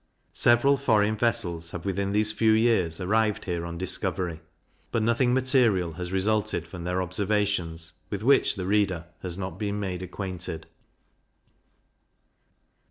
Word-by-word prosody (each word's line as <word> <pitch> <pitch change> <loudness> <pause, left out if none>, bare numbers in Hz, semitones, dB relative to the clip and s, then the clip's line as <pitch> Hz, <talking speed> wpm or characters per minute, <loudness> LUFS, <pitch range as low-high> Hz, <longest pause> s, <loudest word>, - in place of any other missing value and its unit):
Several 120 +4 +4
foreign 110 -5 +2
vessels 100 -8 -1
have 85 -1 -7
within 100 0 -1
these 105 +1 +3
few 110 0 +3
years 110 -8 +2
arrived 105 +3 0
here 85 -2 -2
on 85 0 -6
discovery; 90 -2 -1 0.5
but 115 - 0
nothing 115 +2 +2
material 125 - +2
has 90 +2 -6
resulted 105 -2 0
from 85 -1 -8
their 90 +1 0
observations, 90 -3 -1 0.2
with 100 0 -4
which 135 +3 +4
the 95 -3 -4
reader 95 -4 +1 0.2
has 90 -1 -4
not 95 -2 -6
been 105 -1 -2
made 95 -3 -4
acquainted. 90 -3 -5
100 Hz, 135 wpm, -26 LUFS, 90-110 Hz, 0.5 s, Several